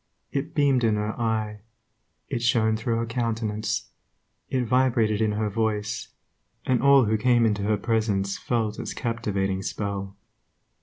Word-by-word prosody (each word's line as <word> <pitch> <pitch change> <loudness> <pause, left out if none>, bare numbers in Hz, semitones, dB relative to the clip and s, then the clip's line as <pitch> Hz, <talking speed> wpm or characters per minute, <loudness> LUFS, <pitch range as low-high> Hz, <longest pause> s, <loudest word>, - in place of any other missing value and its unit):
It 140 0 -3
beamed 140 -4 +3
in 110 -2 +3
her 105 +1 -1
eye; 110 -2 -1 0.7
it 120 - -3
shone 110 -2 +3
through 115 +1 -1
her 115 - -1
countenance; 115 -2 -2 0.6
it 130 -2 0
vibrated 115 -3 +2
in 110 -1 +2
her 105 +1 0
voice; 105 0 -1 0.6
and 130 -2 +2
all 140 -1 +6
who 110 +1 +1
came 120 0 +4
into 105 -2 +1
her 105 +1 +1
presence 100 -3 0
felt 110 -1 -1
its - - -5
captivating 100 -5 -1
spell. 100 0 -4
110 Hz, 145 wpm, -25 LUFS, 105-120 Hz, 0.7 s, all